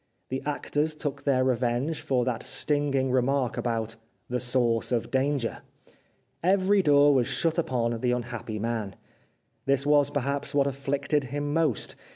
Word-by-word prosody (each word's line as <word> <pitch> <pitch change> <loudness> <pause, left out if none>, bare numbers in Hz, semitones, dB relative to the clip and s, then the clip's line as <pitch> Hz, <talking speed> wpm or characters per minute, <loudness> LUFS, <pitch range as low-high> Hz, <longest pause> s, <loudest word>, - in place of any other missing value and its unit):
The 130 +1 -3
actors 150 +1 -1
took 145 -2 -4
their 130 -2 +3
revenge 130 +4 0
for 125 -3 0
that 125 -3 -1
stinging 140 -3 0
remark 130 -1 +1
about 115 -2 -2 0.2
" - - -44
the 125 - 0
source 120 -2 +1
of 120 -2 -1
danger." 135 -2 0 0.8
Every 195 +2 +3
door 145 -3 +5
was 125 -3 +2
shut 165 0 0
upon 120 -6 -1
the 125 +1 +1
un 125 -1 -1
happy 115 -2 -6
man. 110 -3 -3 0.7
This 140 0 +2
was, 145 -1 +4
perhaps, 140 +1 -2
what 140 -1 +4
afflicted 140 +1 -1
him 145 +3 -3
most. 155 -8 0
135 Hz, 155 wpm, -27 LUFS, 120-145 Hz, 0.8 s, door